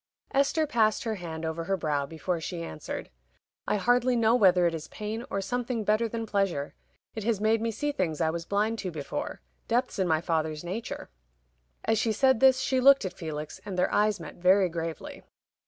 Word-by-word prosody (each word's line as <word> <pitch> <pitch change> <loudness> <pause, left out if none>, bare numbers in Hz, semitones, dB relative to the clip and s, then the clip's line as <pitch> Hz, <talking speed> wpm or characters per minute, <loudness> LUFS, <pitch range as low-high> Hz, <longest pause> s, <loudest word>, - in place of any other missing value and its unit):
Esther 280 +3 +2
passed 225 -7 +2
her 225 - -1
hand 165 -5 -6
over 160 +1 -3
her 195 +1 0
brow 145 -4 -1
before 165 +3 -3
she 170 +1 -4
answered. 80 - -6 0.6
"I - - +2
hardly 245 +4 +3
know 230 -1 +4
whether 185 -7 +5
it 170 - +2
is 160 -1 -5
pain, 215 +2 -5
or 195 - -1
something 240 +2 -2
better 215 +2 +2
than 230 0 -3
pleasure. 195 -9 -1 0.4
It 220 - -5
has 220 -2 +1
made 220 +1 +2
me 230 - 0
see 290 +7 -2
things 170 - -2
I 160 -1 +2
was 170 0 -4
blind 215 +3 0
to 190 - -3
before 155 -4 -5 0.3
depths 245 -2 0
in 190 - +2
my 160 -2 +3
father's 160 -2 -1
nature." 190 - -5 0.7
As 225 -1 +2
she 225 - +1
said 260 +1 +3
this, 265 0 +5
she 260 -1 +1
looked 275 -3 +6
at 185 - -3
Felix, 155 -3 -6
and 195 -3 -6
their 180 - +1
eyes 210 -1 +2
met 160 -3 -9
very 185 +1 +4
gravely. 165 -1 -5
200 Hz, 200 wpm, -28 LUFS, 165-230 Hz, 0.7 s, looked